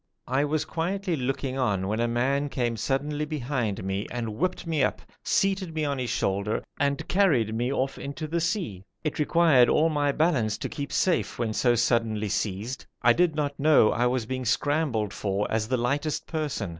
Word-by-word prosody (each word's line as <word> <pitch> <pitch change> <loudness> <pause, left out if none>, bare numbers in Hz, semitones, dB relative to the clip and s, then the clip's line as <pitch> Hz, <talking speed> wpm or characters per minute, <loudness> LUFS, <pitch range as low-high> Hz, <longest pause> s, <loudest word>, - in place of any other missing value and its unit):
I 135 +3 +1
was 150 +1 -1
quietly 180 +2 -2
looking 135 0 -2
on 100 -7 0
when 110 +3 -1
a 120 - +2
man 135 +5 0
came 120 -4 -1
suddenly 145 +6 -1
behind 130 -9 -2
me 95 +2 -2
and 120 -2 -3
whipped 185 +8 -1
me 160 -3 0
up, - - -1 0.2
seated 190 -4 0
me 155 -1 0
on 140 -2 -1
his 125 -2 -2
shoulder 100 +2 -1 0.2
and 140 0 0
carried 145 - +2
me 120 +3 -1
off 135 0 -1
into 140 +2 -5
the 165 +2 -1
sea. 165 - -2 0.2
It 155 -1 -2
required 150 -5 +5
all 160 +2 +4
my 145 -2 +1
balance 135 -9 +1
to - - -4
keep 140 -1 -5
safe 140 - +1
when 115 -2 -1
so 120 +2 +3
suddenly 115 -2 +1
seized. 105 +5 -3 0.2
I 120 - +6
did 175 0 +2
not 145 -2 -2
know 145 -7 +5
I 120 +1 +2
was 125 -2 0
being 130 +2 -3
scrambled 125 -3 0
for 100 0 -1
as 110 0 0
the 130 +2 +1
lightest 145 +5 -1
person. 150 - -3
135 Hz, 190 wpm, -26 LUFS, 115-155 Hz, 0.2 s, I